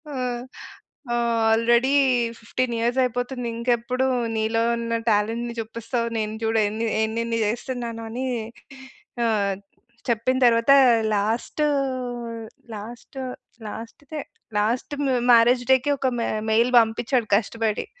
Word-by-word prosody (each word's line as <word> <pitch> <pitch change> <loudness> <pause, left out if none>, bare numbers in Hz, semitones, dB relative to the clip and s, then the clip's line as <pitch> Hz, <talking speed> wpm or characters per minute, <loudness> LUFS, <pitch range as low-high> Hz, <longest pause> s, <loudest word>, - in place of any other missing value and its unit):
ఆ! - - -4 1.3
Already 235 +4 +3 0.5
15 240 +1 -2
years 240 +3 0
అయిపోతుంది. 245 0 -2
ఇంకెప్పుడు 245 +2 0 0.3
నీలో 220 +1 +1 0.2
ఉన్న 230 0 -1
టాలెంట్‌ని 230 +3 0
జూపిస్తావు? 230 +1 -3
నేను 215 0 -2
జూడు 225 0 +2
ఎన్ని 225 +2 -2 0.2
ఎన్ని 230 +1 -2
జేస్తున్నాను 235 0 -3
అని 250 +3 -4 1.0
ఆహ్, 205 -3 +1 0.5
చెప్పిన 235 +3 +1
తరువాత 230 +2 +4 0.4
లాస్టు, 220 +8 0 1.1
లాస్ట్, 235 +5 -9 0.5
లాస్ట్‌దే 285 +8 -7 0.4
లాస్ట్ 225 +7 0 0.4
మ్యారేజ్ 240 +2 +6
డేకి 265 +2 +3
ఒక 265 - 0
మె 230 - 0 0.2
మెయిల్ 230 +3 +3
బంపించాడు 225 +1 +1
కష్టపడి. 220 0 -1
230 Hz, 100 wpm, -24 LUFS, 225-245 Hz, 1.3 s, మ్యారేజ్